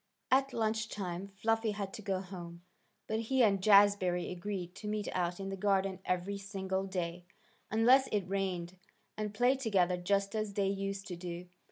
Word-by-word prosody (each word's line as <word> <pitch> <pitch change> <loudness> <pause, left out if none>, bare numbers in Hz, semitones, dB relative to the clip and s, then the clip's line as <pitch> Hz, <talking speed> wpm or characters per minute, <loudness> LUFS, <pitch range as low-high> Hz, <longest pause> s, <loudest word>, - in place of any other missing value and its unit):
At 270 +1 +4
lunch 220 -2 0
time 185 -2 -4
Fluffy 220 +2 0
had 200 -2 -4
to - - -7
go 195 -3 -1
home, 175 -2 -9 0.4
but 220 0 -1
he 255 +3 +2
and 200 -3 +3
Jazbury 200 -3 +5
agreed 180 -1 -4
to 210 - -7
meet 210 0 -2
out 175 0 -1
in 195 0 -4
the 195 - -3
garden 195 -1 +1
every 180 +3 -1
single 195 -1 -3
day, 175 -2 -3 0.5
unless 250 +5 +5
it 200 -3 -1
rained, 185 -2 -2 0.4
and 210 -1 -3
play 245 +5 +3
together 195 -8 +2
just 200 +3 0
as 215 -2 -2
they 195 -1 +2
used 195 0 -3
to 180 - -5
do. 175 0 -6
195 Hz, 175 wpm, -33 LUFS, 180-215 Hz, 0.5 s, Jazbury